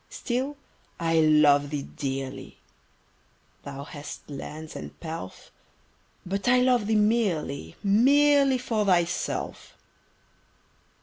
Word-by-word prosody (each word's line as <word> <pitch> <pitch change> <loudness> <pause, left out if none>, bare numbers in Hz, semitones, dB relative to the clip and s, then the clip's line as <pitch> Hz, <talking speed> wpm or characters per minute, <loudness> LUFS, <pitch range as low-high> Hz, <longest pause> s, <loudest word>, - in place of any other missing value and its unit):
Still 265 +3 -3 0.4
I 165 -1 +2
love 150 -2 +5
thee 145 -2 -3
dearly! 135 -3 -6 1.0
Thou 140 0 -7
hast 145 0 -9
lands 150 +2 -8
and - - -9
pelf: 160 - -8 0.7
But 195 +4 -3
I 250 +1 +5
love 250 -4 +2
thee 220 - +2
merely 200 - 0
Merely 275 +6 +4
for 230 -4 -1
thyself. 175 -3 -1
175 Hz, 100 wpm, -26 LUFS, 145-240 Hz, 1.0 s, love